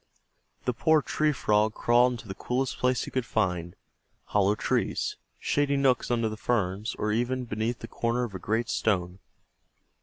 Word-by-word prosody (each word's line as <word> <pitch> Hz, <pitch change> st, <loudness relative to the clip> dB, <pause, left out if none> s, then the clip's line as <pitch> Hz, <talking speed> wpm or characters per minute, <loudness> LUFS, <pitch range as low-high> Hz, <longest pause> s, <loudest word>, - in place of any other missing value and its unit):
The 125 Hz, -, +1 dB
poor 155 Hz, +5 st, +3 dB
Tree 155 Hz, 0 st, +1 dB
Frog 105 Hz, -5 st, +1 dB
crawled 120 Hz, +1 st, +4 dB
into 115 Hz, -2 st, -8 dB
the 95 Hz, -, -4 dB
coolest 125 Hz, +5 st, -2 dB
place 125 Hz, -2 st, +2 dB
he -, -, -7 dB
could 130 Hz, -, 0 dB
find 90 Hz, -7 st, -1 dB, 0.5 s
hollow 105 Hz, 0 st, +2 dB
trees, -, -, -1 dB, 0.2 s
shady 145 Hz, -1 st, +1 dB
nooks 135 Hz, -2 st, +2 dB
under 115 Hz, -2 st, +1 dB
the 110 Hz, 0 st, -5 dB
ferns, 105 Hz, -2 st, -1 dB
or 105 Hz, -, -1 dB
even 125 Hz, +3 st, 0 dB
beneath 115 Hz, +1 st, -2 dB
the -, -, -6 dB
corner 120 Hz, +1 st, -1 dB
of 115 Hz, -5 st, -4 dB
a 95 Hz, -, -5 dB
great 110 Hz, +5 st, -1 dB
stone. 95 Hz, -5 st, 0 dB
115 Hz, 170 wpm, -28 LUFS, 105-125 Hz, 0.5 s, crawled